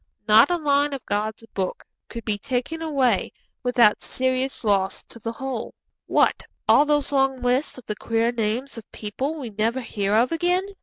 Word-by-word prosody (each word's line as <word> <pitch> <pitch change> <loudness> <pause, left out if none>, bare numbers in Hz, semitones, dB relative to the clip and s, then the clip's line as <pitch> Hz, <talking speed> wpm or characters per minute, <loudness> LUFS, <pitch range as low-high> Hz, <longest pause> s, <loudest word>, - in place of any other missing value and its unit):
Not 220 +6 +7
a 350 - +2
line 290 -2 +2
of 270 - -6
God's 215 +2 -2
Book 190 -2 -3 0.3
could 230 - -7
be 210 -2 -1
taken 260 +8 -3
away 270 -9 +1 0.3
without 245 -4 +3
serious 260 0 -1
loss 195 -3 +1
to 230 - -13
the 225 +1 -4
whole. 260 -1 -5 0.3
'What, - - +3 0.3
all 290 - +6
those 295 -1 +1
long 270 -1 +2
lists 250 +4 0
of 255 - -11
the 210 - -3
queer 230 +2 0
names 235 +3 -2
of 220 - -17
people 260 +9 -4
we 260 -7 -6
never 220 +5 0
hear 205 -3 -1
of 235 +3 +3
again?' 355 +3 +1
245 Hz, 175 wpm, -24 LUFS, 220-275 Hz, 0.3 s, Not